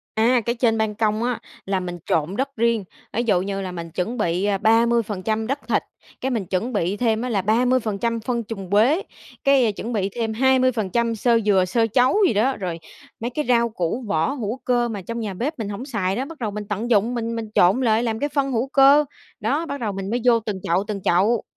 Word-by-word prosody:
Á, 235 +3 +3
cái 235 - +1
trên 230 -2 +1
ban 220 -1 0
công 215 0 0
á, 245 -1 -1 0.3
là 195 -1 0
mình 175 -1 -5
trộn 165 +5 0
đất 275 +2 -2
riêng. 230 -2 +1 0.3
Ví 235 - 0
dụ 200 -6 +2
như 195 0 -3
là 185 -2 -5
mình 170 -1 -7
chuẩn 190 +9 -3
bị 180 0 0
30% 225 -2 +2
đất 275 +4 -1
thịt, - - +2 0.4
cái 265 - -1
mình 225 -7 -2
chuẩn 195 +7 -2
bị 195 -2 0
thêm 225 0 +1
á 250 - -2
là 205 -5 0
30% 230 0 +1
phân 235 +1 -2
trùn 195 -4 -7
quế, 245 - +4 0.4
cái 265 -5 +4
chuẩn 225 +4 -6
bị 200 -4 0
thêm 225 -1 -2
20% 235 -3 +2
xơ 230 +1 +2
dừa, 195 -3 +4
xơ 225 +5 +1
trấu 250 - +3
gì - - +2
đó, 250 +6 +2
rồi 180 -4 -4 0.4
mấy 235 +2 -2
cái 300 +4 -2
rau 235 -1 +3
củ 220 +3 -3
vỏ 160 +5 +1
hữu 235 -4 -3
cơ 240 -1 +1
mà 210 -4 -5
trong 230 +5 -5
nhà 210 -4 -4
bếp 280 - -3
mình 220 -3 -3
hổng 205 +5 -5
xài 200 -8 -1
đó, 255 - -1
bắt 320 +2 -10
đầu 225 -4 -2
mình 210 +1 -5
tận 215 +4 -3
dụng 225 +2 +3
mình 230 -1 -3
mình 225 -1 -4
trộn 185 +8 +4
lại 225 -2 +2
làm 225 -2 -1
cái 290 - -1
phân 275 -2 -1
hữu 240 +2 0
cơ. 280 +2 +6 0.4
Đó, 315 +4 0
bắt 280 -3 -5
đầu 215 -4 -2
mình 195 0 -5
mới 240 +2 0
vô 235 -2 +5
từng 210 -3 -4
chậu, 175 +4 +1
từng 205 -2 -4
chậu. 205 +7 +2
225 Hz, 230 wpm, -22 LUFS, 200-245 Hz, 0.4 s, cơ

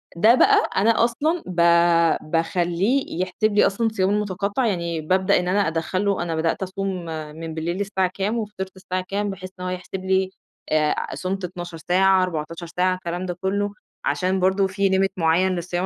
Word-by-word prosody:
ده 220 +8 +6
بقى - - +4
أنا 225 +3 +4
أصلًا 305 +9 0
با 170 -1 +4
باخليّه 175 - 0
يحسب 205 +3 0
لي 205 - +5
أصلًا 225 +4 0
الصيام 195 -3 0
المتقطع، 205 +3 -1
يعني 170 -4 -2
بابدأ 185 +4 +2
إن 180 - -3
أنا 195 0 +2
أدخل 165 +5 -1
له 200 -3 +1
أنا 165 -2 -2
بدأت 165 +4 0
أصوم 190 -2 -4 0.3
من 165 0 -6
بالليل 170 +4 -3
الساعة 190 -2 0
كام 205 +4 -1
وفطرت 200 -3 -5
الساعة 185 0 -4
كام 205 +1 -1
بحيث 185 -1 -7
إن - - -6
هو - - -2
يحسب 185 +1 -6
لي 190 0 +2 0.4
أ 155 -1 +1
صُمتُ 190 +1 -3
12 175 -1 -7
ساعة، 185 +2 +3
14 165 0 -4
ساعة، 180 +2 +1
الكلام 175 0 -4
ده 180 -1 -4
كله، 200 +2 0 0.3
عشان 185 +1 0
برضه 190 +1 +2
في 195 +1 0
limit 190 0 +2
معين 175 +3 +2
للصيام 175 +1 -2
185 Hz, 180 wpm, -23 LUFS, 175-200 Hz, 0.4 s, ده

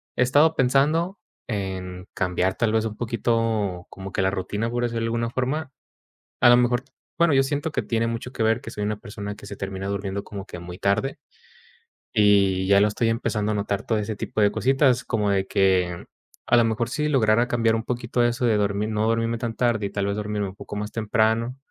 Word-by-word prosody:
he - - 0
estado 145 +6 +4
pensando 150 +8 +2 0.3
en 95 -3 -4
cambiar 90 0 0
tal 115 -2 +1
vez, 110 0 +2
un 110 -1 -4
poquito 115 -5 -1
como 95 0 -8
que - - 0
la 95 - +2
rutina 100 +4 -2
por 120 +1 -2
eso 120 - -3
de 115 -1 -1
alguna 115 0 -1
forma 135 +4 -2 0.7
a 120 - +7
lo 120 - +7
mejor. 125 0 +2 0.3
Bueno, 170 -2 +4
yo 135 - +5
siento 145 +3 -2
que - - -1
tiene 115 -1 -1
mucho 115 +2 -4
que 115 - -2
ver, 110 +2 +2
que - - -8
soy 105 -2 -5
una 105 0 -1
persona 105 -2 -6
que 100 - -12
se 100 - -7
termina 95 0 -5
durmiendo 100 0 -3
como 100 -1 -8
que 90 - -9
muy 90 +1 -8
tarde. 100 +8 0 1.0
Y 100 -3 +4
ya 100 0 +6
lo 105 - +4
estoy 115 +2 0
empezando 110 -2 -1
a - - -2
notar 100 0 -1
todo 110 - +1
ese 105 +1 -3
tipo 105 - -4
de 105 -1 +4
cositas 130 +1 +2
como 105 -3 0
de 95 -1 0
que, 90 -3 +1 0.4
a 120 - +4
lo 120 - +5
mejor 115 +1 0
si 150 +3 -1
lograra 120 -3 +3
cambiar 115 -2 +2
un 115 0 -1
poquito 120 0 -1
eso 120 +1 +1
de 115 -3 +3
dormir, 105 +1 0
no 110 0 0
dormirme 115 0 0
tan 115 -1 -3
tarde. 115 -4 +1
Y - - -8
tal 100 0 -2
vez, 100 - -1
dormirme 105 -1 -2
un 95 - -12
poco 105 - -8
más 105 0 -4
temprano, 115 +3 0
110 Hz, 220 wpm, -24 LUFS, 100-120 Hz, 1.0 s, a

